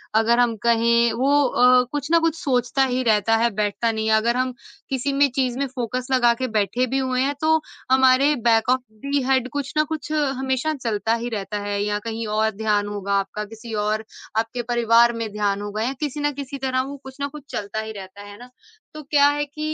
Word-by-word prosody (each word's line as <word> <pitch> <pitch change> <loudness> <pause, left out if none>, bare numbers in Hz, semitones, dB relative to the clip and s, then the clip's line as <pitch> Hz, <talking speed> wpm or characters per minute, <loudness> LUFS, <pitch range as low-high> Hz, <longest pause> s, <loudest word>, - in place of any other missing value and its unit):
अगर 230 +2 +3
हम 235 -2 +3
कहें 235 0 +3
वो 275 +2 +2 0.2
अ, 250 +1 +5
कुछ 290 -1 -3
न 335 - +6
कुछ 330 -1 +1
सोचता 255 0 +1
ही 255 0 -1
रहता 225 0 +3
है, 235 +1 +2
बैठता 215 +2 0
नहीं 220 0 -2
है। 220 - +5
अगर 235 +3 +1
हम 255 0 0 0.4
किसी 270 +1 -1
में 280 0 +3
चीज़ 255 -2 0
में 280 - +1
फ़ोकस 250 0 -4
लगा 240 -2 +4
के 255 - 0
बैठे 235 +5 +1
भी 270 - -1
हुए 255 -1 0
हैं 280 +2 +1
तो 320 0 +3 0.3
हमारे 265 +2 +5 0.2
बैक 225 +1 +3
ऑफ 255 0 +3 0.2
द 280 0 +1
हेड 260 -1 +2
कुछ 280 -1 -4
न 305 - +5
कुछ 305 0 -6
हमेशा 270 0 0
चलता 220 -1 0
ही 240 - -3
रहता 210 -1 -4
है 205 0 -2
या 205 0 -1
कहीं 225 0 -5
और 215 +1 +1
ध्यान 210 -1 0
होगा 200 -1 -3
आपका, 210 +2 -4
किसी 225 +1 -10
और 215 +1 -1 0.3
आपके 230 +2 -1
परिवार 235 0 +4
में 225 -2 -4
ध्यान 205 -1 -1
होगा 205 +1 -4
या 260 +3 -1
किसी 295 -1 -3
न 290 0 0
किसी 275 0 -6
तरह 260 -1 0
वो 285 - -7
कुछ 265 +1 -11
न 280 - 0
कुछ 300 -1 -11
चलता 205 +1 -4
ही 220 0 -5
रहता 200 -1 -10
है, 205 - -11
है 205 - -12
ना? 245 +1 -12 0.4
तो 305 - -8
क्या 285 0 +4
है 290 0 -1
कि 290 +2 -17
240 Hz, 225 wpm, -22 LUFS, 220-270 Hz, 0.4 s, न